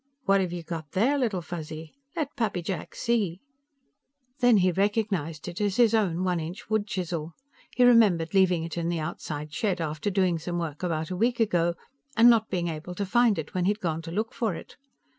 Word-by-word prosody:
"What 195 -4 +3
have 180 -2 -2
you 175 -1 -5
got 160 -3 -6
there, 230 +10 +3
Little 220 -10 0
Fuzzy? 160 -1 -7 0.2
Let 315 -4 -3
Pappy 210 -8 -1
Jack 175 -2 -5
see?" 205 -7 0 1.0
Then 245 -3 +5
he 185 -1 +3
recognized 195 -6 -1
it 175 +3 -5
as 205 -2 +1
his 235 -2 +4
own 185 -6 +1
one 180 -2 +1
inch 170 +6 -7
wood 215 -1 +1
chisel. 170 -4 -3 0.4
He 250 - +4
remembered 205 -9 +5
leaving 185 -4 +3
it 165 +1 -4
in 170 0 -1
the 175 - -1
outside 155 -2 -5
shed 190 -1 0
after 155 +3 -2
doing 185 -4 +1
some 175 +2 -4
work 160 -4 -4
about 160 -2 -2
a - - -2
week 235 +5 +1
ago, 175 -6 +2 0.4
and 235 +2 +8
not 220 -2 +2
being 175 -2 -1
able 165 +2 -5
to 200 - -2
find 235 +2 +3
it 160 - -5
when 180 -1 0
he - - +3
had 210 +1 0
gone 165 -4 -2
to 165 0 -8
look 215 +5 -2
for 220 -7 -1
it. - - -10
180 Hz, 210 wpm, -27 LUFS, 165-215 Hz, 1.0 s, and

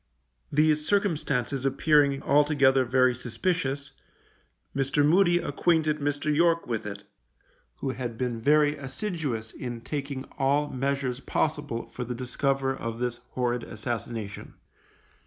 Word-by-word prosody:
These 150 +1 +3
circumstances 150 - 0
appearing 140 0 +3
altogether 140 -3 +4
very 130 0 +3
suspicious, 140 - -2 0.8
Mr. 140 +2 +2
Moody 175 +2 +5
acquainted 155 -1 +1
Mr. 145 +1 0
York 170 +1 +3
with 115 -3 -3
it, 100 - -7 0.8
who 135 - -1
had 120 -3 -5
been 120 -2 -2
very 150 +2 +4
assiduous 135 - -4
in 120 -2 -6
taking 140 0 -4 0.2
all 145 +2 +2
measures 135 -1 -1
possible 145 -5 -2
for 125 - -4
the 125 0 -4
discover 135 +2 0
of 115 -2 -5
this 120 0 -2 0.2
horrid 120 -1 0
assassination. 110 -2 -5
135 Hz, 120 wpm, -27 LUFS, 125-150 Hz, 0.8 s, Moody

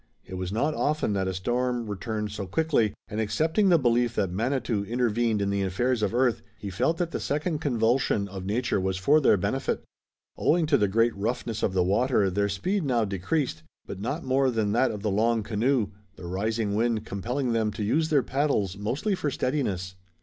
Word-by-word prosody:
It 95 - -11
was 95 0 -4
not 145 +9 0
often 150 -7 0
that 95 -1 0
a 95 - -1
storm 120 +5 -1
returned 105 +1 -3
so 100 -2 -5
quickly, 140 - +1
and 105 +2 -3
accepting 160 - +2
the 175 - +6
belief 120 -3 +2
that 95 - 0
Manitou 115 0 -1
intervened 115 -1 0
in 100 - 0
the 100 0 0
affairs 115 +6 0
of 105 - +1
earth, 120 -1 +2 0.2
he 100 - -6
felt 160 - +1
that 170 -1 -1
the - - -3
second 150 +2 -1
convulsion 120 -6 +1
of 95 -1 -7
nature 105 +1 0
was 95 0 -1
for 145 +11 +4
their 105 - +5
benefit. 90 - -1 0.5
Owing 170 0 +2
to 150 -2 +3
the 105 - +3
great 115 +4 +2
roughness 115 +2 -2
of 95 - 0
the 95 -1 +3
water 100 +1 +2
their 100 +2 +1
speed 185 - -1
now 120 -6 +1
decreased, 100 - -2 0.2
but 95 - -7
not 140 +10 -3
more 130 +1 +2
than 110 -4 0
that 125 +4 +3
of 105 -2 -6
the 105 - 0
long 110 +2 +2
canoe, 110 +1 +1 0.3
the 90 - -10
rising 105 +4 -1
wind 110 0 0
compelling 120 +6 -2
them 110 -2 +1
to 105 - -4
use 155 +10 +1
their 145 -5 +3
paddles 130 -9 0
mostly 130 - -1
for 180 -6 -1
steadiness. 115 -10 -2
115 Hz, 200 wpm, -27 LUFS, 100-130 Hz, 0.5 s, the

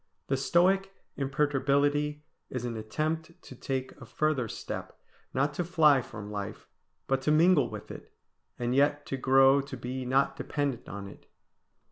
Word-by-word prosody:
The 135 - +2
Stoic 190 +7 +2 0.2
imperturbability 145 +1 +1 0.3
is 125 -1 -4
an 120 -1 -3
attempt 155 +9 -3
to - - -11
take 130 +1 -3
a - - -8
further 150 -3 0
step; - - -6 0.3
not 140 +3 0
to 175 - -1
fly 155 -5 +4
from 105 -3 -9
life, 100 0 -6 0.4
but 135 0 0
to 150 - +1
mingle 160 -1 +5
with - - -8
it, - - -11 0.5
and 120 0 -1
yet 145 +2 +2
to 135 - -3
grow 135 +1 +5
to 135 -1 -8
be 125 +2 -4
not 135 +1 +2
dependent 140 -1 -3
on 100 0 -6
it. - - -14
135 Hz, 155 wpm, -29 LUFS, 130-150 Hz, 0.5 s, mingle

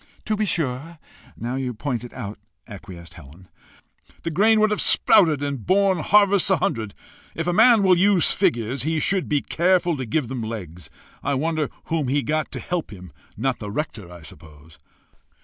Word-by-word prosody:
"To 215 - 0
be 215 0 -1
sure 160 -2 -3 0.4
now 120 +2 -4
you 125 -3 -4
point 125 0 -4
it 120 - -10
out!" 105 -5 -8 0.3
acquiesced 95 -4 -11
Helen. 85 +2 -15 0.7
"The 165 - -3
grain 215 +6 +3
would 215 0 +3
have 210 - +1
sprouted 160 -9 +4
and 140 -5 -4
borne 190 -1 +2
harvests 200 +2 +3
a 190 - +3
hundred. 110 -7 -3 0.4
If 165 - -3
a 175 - 0
man 225 +1 +5
will 185 -1 +5
use 190 0 +4
figures, 130 - 0
he 160 +3 -1
should 190 +4 -1
be 145 -2 0
careful 175 0 +1
to 130 - -4
give 135 +3 -1
them 125 0 -5
legs. 90 -8 -7 0.3
I 140 - -1
wonder 155 +1 -1
whom 160 -4 -2
he 140 +2 0
got 155 +1 -2
to - - -4
help 175 -2 -4
him 90 -4 -12 0.3
not 135 -2 -2
the 105 - -7
rector, 105 - -5
I 85 -2 -12
suppose?" 75 0 -15
145 Hz, 185 wpm, -22 LUFS, 110-180 Hz, 0.7 s, man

